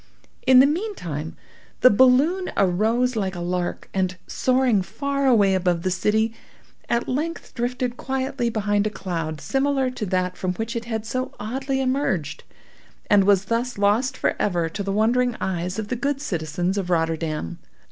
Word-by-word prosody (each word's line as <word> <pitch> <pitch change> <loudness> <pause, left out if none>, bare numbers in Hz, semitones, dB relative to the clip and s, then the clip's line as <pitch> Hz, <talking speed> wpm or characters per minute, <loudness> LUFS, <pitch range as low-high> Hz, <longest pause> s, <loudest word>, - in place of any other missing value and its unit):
In 260 -1 +7
the - - +6
meantime 280 - -3 0.4
the 255 - +8
balloon 265 - +4
arose 220 +7 +2
like 195 -3 -1
a - - -5
lark, 175 0 -3
and, 185 -1 -1
soaring 255 -5 +2
far 280 +7 -2
away 205 -6 +4
above 180 -2 +1
the 185 - 0
city, 220 +4 +1 0.6
at 235 0 0
length 315 +6 -3
drifted 245 0 -2
quietly 265 -2 -2
behind 205 -2 0
a - - 0
cloud 165 -6 -4
similar 270 - 0
to 225 -5 -4
that 180 0 0
from 180 -1 -2
which 225 +4 -4
it 235 0 -3
had 220 -2 -3
so 255 +4 -3
oddly 265 +5 -2
emerged, 255 - -1 0.7
and 200 -2 +6
was 195 -1 +4
thus 235 +3 -1
lost 225 +6 +2
forever 175 -5 0
to 185 - -5
the 195 0 -2
wondering 235 +4 +2
eyes 180 0 -2
of 215 -1 -4
the 250 - -1
good 275 +3 -1
citizens 175 - -2
of 185 -2 -4
Rotterdam. 165 - -1
220 Hz, 160 wpm, -23 LUFS, 185-255 Hz, 0.7 s, the